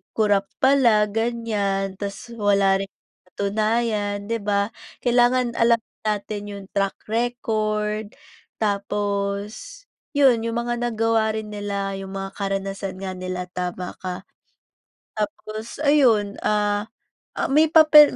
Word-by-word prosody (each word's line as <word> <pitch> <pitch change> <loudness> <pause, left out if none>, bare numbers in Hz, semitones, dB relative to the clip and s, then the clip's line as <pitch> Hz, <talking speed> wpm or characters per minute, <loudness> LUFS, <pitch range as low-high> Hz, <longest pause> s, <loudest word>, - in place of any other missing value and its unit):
kurap 205 -2 +3 0.2
pala, 235 -6 +5
ganiyan 210 -4 -1
tas 200 +3 -6
wala 200 -2 +3
ring 195 - -3
napatunayan, 210 +2 -2
di 230 - +1
ba? 200 0 0 0.3
Kailangan 245 0 +3
alam 230 0 +4 0.3
natin 210 0 -2
yung 200 -1 -8
track 195 -1 0
record 215 -2 -1 0.5
tapos 205 - -2 0.3
yun, 270 -5 +5
yung 230 - -2
mga 240 0 -1
nagawa 225 -2 +1
rin 215 -1 -5
nila, 200 -1 -3
yung 195 0 -7
mga 195 0 -4
karanasan 195 -1 -3
nga 190 - -3
nila, 185 -1 -5
tama 180 0 -4
ka. 185 0 -5 0.9
Tapos 215 +5 -5
ayun, 235 -9 +4
ah, 210 0 +1 0.5
ah, - - -1
may 305 +3 +5
papel 305 -2 +8
210 Hz, 115 wpm, -23 LUFS, 200-230 Hz, 0.9 s, papel